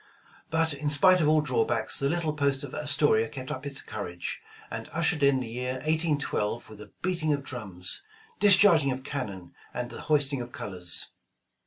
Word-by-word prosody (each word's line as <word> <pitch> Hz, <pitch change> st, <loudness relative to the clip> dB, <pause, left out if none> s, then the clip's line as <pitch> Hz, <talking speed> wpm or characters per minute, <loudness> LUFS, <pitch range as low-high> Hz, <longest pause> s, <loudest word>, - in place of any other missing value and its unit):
But 160 Hz, 0 st, +1 dB
in 145 Hz, +1 st, -2 dB
spite 185 Hz, +5 st, +5 dB
of 150 Hz, -, +3 dB
all 155 Hz, 0 st, +4 dB
drawbacks, 130 Hz, -6 st, 0 dB
the 140 Hz, -, +1 dB
little 165 Hz, -2 st, -1 dB
post 140 Hz, -2 st, 0 dB
of 140 Hz, -, -8 dB
Astoria 145 Hz, -6 st, +2 dB
kept 130 Hz, -2 st, -7 dB
up 130 Hz, +2 st, -5 dB
its 140 Hz, -1 st, -7 dB
courage, 90 Hz, -6 st, -6 dB, 0.3 s
and -, -, -6 dB
ushered 160 Hz, -1 st, +1 dB
in 140 Hz, -2 st, +4 dB
the 125 Hz, -, -5 dB
year 125 Hz, +3 st, -3 dB
1812 145 Hz, -6 st, -1 dB
with 105 Hz, -1 st, -11 dB
a 105 Hz, -, -12 dB
beating 170 Hz, -4 st, 0 dB
of 140 Hz, -1 st, -3 dB
drums, 95 Hz, -9 st, +1 dB, 0.4 s
discharging 185 Hz, -7 st, +6 dB
of 130 Hz, 0 st, -3 dB
cannon 105 Hz, -11 st, -5 dB, 0.2 s
and 125 Hz, 0 st, -4 dB
th.» -, -, -7 dB
hoisting 145 Hz, -3 st, +1 dB
of 120 Hz, 0 st, -8 dB
colors. 90 Hz, -6 st, 0 dB
140 Hz, 175 wpm, -27 LUFS, 120-155 Hz, 0.4 s, discharging